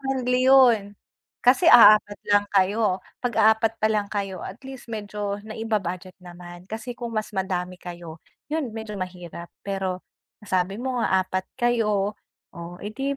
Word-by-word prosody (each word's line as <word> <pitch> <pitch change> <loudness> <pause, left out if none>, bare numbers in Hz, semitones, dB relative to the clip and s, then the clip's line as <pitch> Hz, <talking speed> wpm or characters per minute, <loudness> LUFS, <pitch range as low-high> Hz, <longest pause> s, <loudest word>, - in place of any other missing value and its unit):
friendly 255 -2 0
yun. 230 -7 +5 0.5
Kasi 265 +8 +5
aapat 210 -5 +7 0.2
lang 205 0 +3
kayo. 200 0 +2 0.2
'Pag 245 -2 -2 0.3
4 225 0 +1
pa 215 0 +1
lang 205 -2 -1
kayo 195 -3 -4
at 190 - -7
least 265 -2 -10
medyo 210 -2 -4
naiba-budget 200 -5 -4
naman. 175 0 -11
Kasi 225 +5 -7
kung 235 -2 -6
mas 215 -1 -2
madami 185 -1 -2
kayo, 175 -2 -9 0.3
yun 295 -7 -2
medyo 220 -2 -6
mahirap. 180 -2 -7
Pero 190 -2 -3 0.4
nasabi 190 0 -1
mo 255 0 -2
nga 190 -4 +2
4 185 0 -3 0.2
kayo, 210 -4 +1 0.4
oh, 170 +1 -8
eh, 205 - -5
'di 275 +4 -3
205 Hz, 150 wpm, -24 LUFS, 185-230 Hz, 0.5 s, aapat